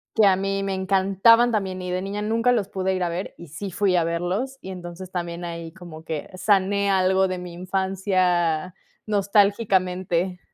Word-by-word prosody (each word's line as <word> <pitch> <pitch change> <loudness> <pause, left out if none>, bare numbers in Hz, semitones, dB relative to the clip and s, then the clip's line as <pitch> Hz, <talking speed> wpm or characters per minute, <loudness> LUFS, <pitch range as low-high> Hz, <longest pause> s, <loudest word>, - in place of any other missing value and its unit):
que 220 -2 +5
a 190 -1 +5
mí 195 +1 -1
me 195 -1 -2
encantaban 195 +5 +4
también, 190 -4 -2
y 180 - -4
de 180 +1 -1
niña 200 +2 -4
nunca 225 +3 +2
los 215 -5 0
pude 190 -1 -1
ir 185 - -2
a 175 - +1
ver, 175 +3 -5
y 170 - -11
sí 195 +7 -6
fui 185 0 +1
a 170 - +2
verlos. 180 +11 -2
Y 190 - -8
entonces, 180 0 -8
también 175 -1 -4
ahí 170 -1 -6
como 170 -3 -11
que 160 -2 -5
sané 200 0 +2
algo 190 0 +3
de 185 0 -3
mi 180 -1 -8
infancia 185 -2 0 0.3
nostálgicamente. 190 -3 +1
190 Hz, 180 wpm, -24 LUFS, 180-200 Hz, 0.3 s, que